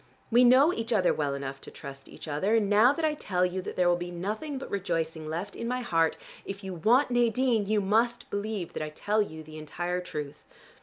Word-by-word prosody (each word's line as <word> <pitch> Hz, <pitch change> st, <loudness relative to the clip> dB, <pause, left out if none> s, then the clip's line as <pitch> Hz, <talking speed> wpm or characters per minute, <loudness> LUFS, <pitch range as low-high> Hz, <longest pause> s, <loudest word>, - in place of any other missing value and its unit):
We 240 Hz, +2 st, +6 dB
know 260 Hz, +7 st, +6 dB
each 230 Hz, +1 st, -3 dB
other 195 Hz, -5 st, +3 dB
well 145 Hz, -2 st, -1 dB
enough 135 Hz, 0 st, -6 dB
to -, -, -10 dB
trust 135 Hz, -1 st, -10 dB
each -, -, -11 dB
other, 170 Hz, +9 st, +1 dB
and 215 Hz, -3 st, +2 dB
now 215 Hz, +5 st, +6 dB
that 315 Hz, +3 st, -1 dB
I 310 Hz, -, +2 dB
tell 180 Hz, -10 st, 0 dB
you 185 Hz, +1 st, -2 dB
that -, -, -7 dB
there 180 Hz, -1 st, +2 dB
will 175 Hz, -, +4 dB
be 175 Hz, 0 st, -5 dB
nothing 215 Hz, -, -4 dB
but 265 Hz, -, -8 dB
rejoicing 165 Hz, -5 st, -2 dB
left 175 Hz, +6 st, -4 dB
in 230 Hz, -, -4 dB
my 250 Hz, +1 st, -1 dB
heart, 165 Hz, -8 st, +1 dB, 0.3 s
if 195 Hz, +1 st, -7 dB
you 190 Hz, -1 st, -5 dB
want 240 Hz, -, +3 dB
Nadine, 240 Hz, -2 st, +2 dB
you 215 Hz, 0 st, +2 dB
must 225 Hz, +5 st, +1 dB
believe 205 Hz, -3 st, -3 dB
that -, -, -4 dB
I 155 Hz, -, -3 dB
tell 205 Hz, +7 st, 0 dB
you 160 Hz, -6 st, -5 dB
the 155 Hz, 0 st, -10 dB
entire 175 Hz, +4 st, -3 dB
truth. 150 Hz, -4 st, -6 dB
195 Hz, 225 wpm, -28 LUFS, 165-230 Hz, 0.3 s, We